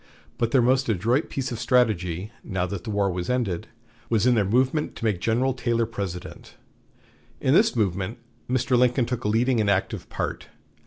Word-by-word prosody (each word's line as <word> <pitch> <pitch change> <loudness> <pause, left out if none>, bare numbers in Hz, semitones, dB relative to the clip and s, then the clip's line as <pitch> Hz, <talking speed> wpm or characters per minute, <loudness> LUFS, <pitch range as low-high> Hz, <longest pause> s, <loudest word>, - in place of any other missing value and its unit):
But 115 - +1
their 125 0 +3
most 130 +1 +2
adroit 115 - +1
piece 135 -1 -3
of 115 - -4
strategy, 105 -7 +1
now 95 -4 -2
that 90 -1 -6
the - - -5
war 100 -2 +1
was 90 0 -4
ended, 115 -9 -1 0.4
was 115 -1 +2
in 125 - +5
their 110 -3 +3
movement 130 +9 +1
to - - -5
make 105 -5 0
General 125 +4 +1
Taylor 120 -2 0
President. 100 -5 -7 0.8
In - - +2
this - - +4
movement 100 0 -1 0.3
Mr. 130 +1 +1
Lincoln 125 0 +3
took 120 -1 -4
a - - +2
leading 115 +2 +2
and 105 - +1
active 100 -1 -1
part. - - -4
115 Hz, 180 wpm, -25 LUFS, 100-125 Hz, 0.8 s, in